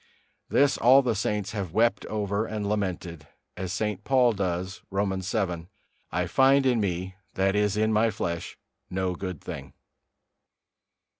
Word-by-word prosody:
This 140 0 +3
all 130 +3 +7
the 120 -2 +1
saints 105 -1 -1
have 100 -6 -4
wept 115 +3 +2
over 105 0 -1
and 105 -2 -3
lamented, 90 -6 -3 0.3
as 95 0 -4
St. 105 0 -2
Paul 125 -2 +4
does, 95 -1 -3
Romans 95 -1 -1
vii: 90 -6 -1 0.4
"I - - 0
find 135 +1 +4
in 125 -3 +3
me, 95 -2 -2 0.2
that 95 +1 +2
is 105 0 +1
in 110 +1 +2
my 110 +2 +4
flesh, 85 -5 -4 0.3
no 95 0 -1
good 90 -2 -5
thing." - - -7
100 Hz, 145 wpm, -27 LUFS, 95-110 Hz, 0.4 s, all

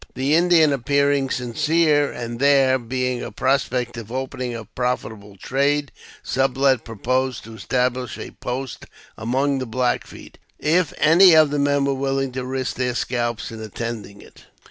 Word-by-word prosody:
The 135 +3 0
Indian 165 -3 +4
appearing 140 +1 +1
sincere, 145 +5 +1
and 120 -1 -6
there 135 -1 +4
being 125 +1 -2
a 115 - -6
prospect 125 0 0
ol 115 - -8
opening 130 -2 -4
a 115 -1 -7
profitable 110 -5 -4
trade, 140 +6 0 0.3
Sublet 135 -1 +1
proposed 130 +4 -2
to 115 - -11
establish 125 +1 -2
a - - -8
post 130 +1 -6 0.3
among 135 +5 0
the 130 - -4
Black 125 +2 -1
Feet - - -13 0.2
if 165 +3 +1
any 170 +3 +6
of 155 -2 +5
the 145 - 0
men 145 0 +2
were 140 - +1
wilHng 135 -1 -2
to 130 0 -4
risk 130 0 -3
their 125 -1 -1
scalps 120 -2 -2
in 110 -1 -8
attending 110 -2 -6
it. - - -18
130 Hz, 155 wpm, -22 LUFS, 120-140 Hz, 0.3 s, any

